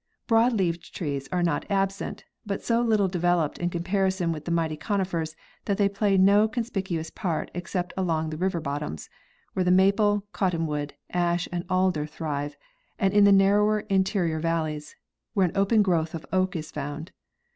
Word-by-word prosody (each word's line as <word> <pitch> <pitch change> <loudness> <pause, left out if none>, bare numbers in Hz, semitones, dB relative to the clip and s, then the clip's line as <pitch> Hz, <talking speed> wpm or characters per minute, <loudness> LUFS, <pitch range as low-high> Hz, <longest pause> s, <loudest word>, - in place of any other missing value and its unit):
Broad 230 +1 +4
leaved 175 -5 -2
trees 140 -4 -3
are 180 -1 +1
not 170 - -1
absent, 195 0 -1 0.2
but 200 -2 -4
so 235 0 +2
little 215 -4 +3
developed 175 -3 0
in 175 - 0
comparison 185 0 0
with 155 -2 -5
the - - -4
mighty 165 -2 0
conifers 170 -4 -2 0.3
that 200 -2 0
they 205 - +4
play 200 0 +1
no 200 +3 +5
conspic 225 -4 -3
uous 165 -2 -3
part 170 -5 -2
except 175 +1 -3
along 160 -4 -1
the 155 - -5
river 185 0 0
bottoms, 145 - -5 0.4
where 185 - +1
the 180 - +1
maple, 200 +2 +3
cotton, 180 -4 0
wood, 150 -1 -3 0.2
ash 175 0 +1
and 175 0 -3
alder 185 -5 +1
thrive, 145 -2 -4 0.4
and 195 0 +1
in 205 0 +6
the 200 - +6
narrow 205 +2 +4
interior 190 -4 +1
valleys. 155 -2 -2 0.4
where 195 -2 +4
an 175 - -3
open 205 +2 +4
growth 165 -4 0
of 160 - -7
oak 185 -1 +1
is 160 -1 -5
found. 145 +4 -5
180 Hz, 175 wpm, -26 LUFS, 160-195 Hz, 0.4 s, in